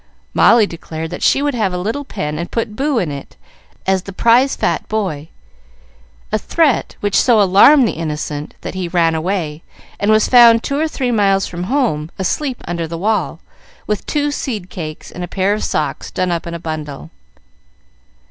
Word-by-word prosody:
Molly 230 -2 +5
declared 160 -2 -7
she 275 - +3
would 290 -1 0
have 215 -6 0
a - - -2
little 220 +10 -3
pen, 150 - -4
and 170 - -4
put 225 -2 -3
Boo 275 +2 0
in 175 -9 0
it, 140 -1 -9 0.5
as 190 -1 +2
the 195 - -9
prize 235 +7 +3
fat - - -1
boy 175 -9 -2 1.0
a 215 - +1
threat 300 +1 +1
which 205 -1 -1
so 240 -4 +4
alarmed 210 +8 +6
the - - 0
innocent 150 -2 -5
that - - -6
he 185 -1 -3
ran 170 -2 +2
away, 160 -2 -2 0.4
and 205 - 0
was 215 0 +4
found 235 -2 +7
two 280 0 -1
or 320 - +1
three 260 -5 -2
miles 195 -3 +2
from 175 0 -5
home, 210 - 0
asleep 255 - -2
under 170 -1 -3
the 165 +1 -5
wall, 195 -3 -1 0.4
with 210 -1 -2
two 295 -1 0
seed 215 -11 -4
cakes 155 -3 -7
and 180 - -7
a - - -4
pair 195 +2 0
of 215 - -3
socks 150 -3 -2
done 185 -1 -1
up 170 0 -3
in 170 - -5
a - - -5
bundle. 155 -2 -6
195 Hz, 185 wpm, -17 LUFS, 165-230 Hz, 1.0 s, found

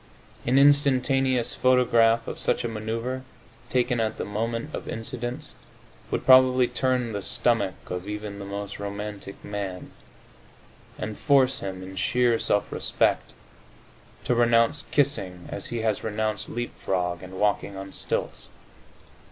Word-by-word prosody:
An 130 +2 +4
instantaneous 135 -3 +4
photograph 115 -3 +3
of - - -5
such - - 0
a - - -1
maneuvre, 115 +3 -3 0.5
taken 125 -1 +1
at 110 -1 -1
the - - -3
moment 115 +6 -3
of - - -5
incidence, 120 +2 -3 0.6
would - - -2
probably 130 -1 +7
turn 125 -2 0
the 100 -1 -3
stomach 100 -2 0
of 90 +2 -5
even 105 -1 -5
the 100 - -6
most 100 0 -6
romantic 100 0 -6
man, 100 -3 -5 1.1
and 105 0 -5
force 135 -2 +3
him, 95 -1 -5
in 95 +1 -9
sheer 120 +2 +2
self 105 - +1
respect, - - 0 0.9
to - - +1
renounce 120 +4 +3
kissing 95 -11 0
as 100 - -5
he 120 -1 -3
has 110 -3 0
renounced 110 -1 -2
leap 120 +1 -4
frog 90 -2 -2
and 95 0 -9
walking 100 -1 0
on 95 0 -7
stilts. - - -3
115 Hz, 135 wpm, -26 LUFS, 100-125 Hz, 1.1 s, probably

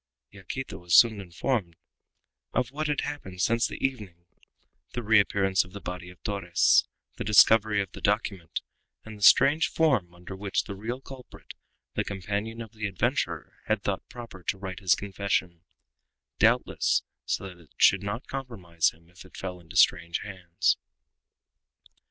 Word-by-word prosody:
Yaquita 100 +7 -7
was 90 -1 +1
soon 110 -4 +6
informed 95 0 -2 0.8
of 125 -1 +1
what 155 +2 -2
had 145 -1 0
happened 95 -12 -6
since 115 +6 +2
the - - -7
evening 100 -10 -5 0.7
the 120 - -3
reappearance 100 -3 +3
of 90 +1 -16
the 100 - -7
body 90 -1 -7
of 90 - -15
Torres, 95 -5 +3 0.3
the - - -3
discovery 105 0 +5
of 95 - -13
the - - -10
document, 100 -5 -1 0.4
and 110 -1 -9
the 105 - -14
strange 145 +9 +6
form 125 - +1
under 90 +2 -9
which 100 0 -1
the - - -7
real 115 +6 -5
culprit, 135 -2 -12 0.4
the - - 0
companion 100 +4 -4
of 110 - -13
the 110 -2 -4
adventurer, 95 -2 -2
had 110 -2 0
thought 95 -1 -3
proper 115 -6 -10
to 95 - -2
write 95 -1 -6
his 95 -3 +3
confession 95 -4 -2 0.8
doubtless, - - +2 0.2
so 95 - -2
that 90 -2 -12
it 85 - -19
should 95 - +5
not 100 +5 -4
compromise 105 -12 -1
him 85 +1 -19
if 90 +2 -15
it 95 - -15
fell 90 -1 -5
into 80 -3 -14
strange 85 0 +3
hands. 90 -4 -1
100 Hz, 155 wpm, -27 LUFS, 90-115 Hz, 0.8 s, soon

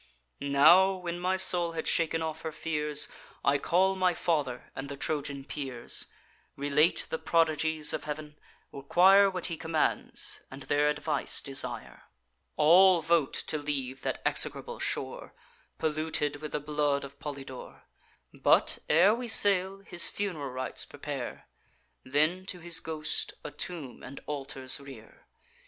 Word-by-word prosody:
Now, 155 +7 +5
when 175 -2 -5
my 185 +1 0
soul 175 -2 +4
had 160 - -4
shaken 165 -1 +1
off 160 0 -5
her 160 - -5
fears, 150 -2 +1 0.4
I 140 +1 +3
call 190 +6 +2
my 185 -2 +1
father 145 -9 -2
and 135 +1 -6
the 140 - -7
Trojan 140 -2 -3
peers; 130 -6 -3 0.5
Relate 145 +4 +2
the 160 - -2
prodigies 160 -1 +1
of - - -4
Heav'n, 150 0 -6 0.4
require 190 +8 +5
What 185 -2 -4
he 165 - -1
commands, 160 0 -1
and 135 +1 -10
their 145 +1 +1
advice 150 -1 0
desire. 135 -1 -4 0.5
All 175 +3 +5
vote 165 -3 +1
to 155 - -2
leave 135 -3 -4
that - - -3
execrable 480 0 +2
shore, - - -4 0.4
Polluted 155 -2 -1
with 150 +1 -8
the - - 0
blood 145 -1 -1
of 140 0 -11
Polydore; 140 -3 -8 0.5
But, - - +2
ere 175 +7 +5
we 240 +1 -4
sail, 195 -3 +3
his 175 -3 +3
fun'ral 175 -9 -4
rites 130 -1 -2
prepare, - - -7 0.6
Then, 155 +8 +1
to 180 - -3
his 170 -1 +2
ghost, 155 -1 -2
a 150 - -6
tomb 150 -3 -6
and 140 +2 -9
altars 135 -2 0
rear. 135 -6 -14
155 Hz, 140 wpm, -29 LUFS, 140-175 Hz, 0.6 s, Now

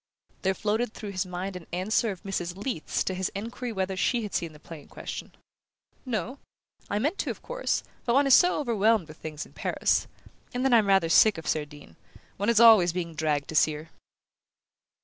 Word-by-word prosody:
There 190 0 +1
floated 215 +3 -1
through 210 -2 -6
his 185 0 -2
mind 185 +2 -5
an 180 -2 -9
answer 215 +6 0
of 190 -4 -7
Mrs. 180 -2 -3
Leath's 205 - -2
to 190 - -2
his 185 0 -2
enquiry 235 +4 -5
whether 190 -2 -2
she 235 +5 +1
had 210 - -6
seen 170 -2 -2
the 150 - -15
play 155 0 -10
in - - -19
question. - - -7 0.8
"No. 245 +3 -3 0.5
I 205 - 0
meant 295 - -1
to, - - -1
of - - -6
course, - - -2 0.2
but 240 -1 +1
one 280 +1 +5
is 275 - +5
so 355 +3 +5
overwhelmed 225 - +2
with 155 0 -12
things 155 -1 -6
in - - -19
Paris. - - 0 0.5
And 250 +1 -1
then 265 - +3
I'm 220 -3 +5
rather 195 -4 +4
sick 205 +5 +5
of 160 - -8
Cerdine 150 - -4 0.4
one 205 +3 0
is 230 -2 +4
always 215 -7 +7
being 170 -2 -4
dragged 150 -2 -1
to 160 - -5
see 155 0 +4
her." 155 +2 -9
195 Hz, 205 wpm, -27 LUFS, 165-230 Hz, 0.8 s, always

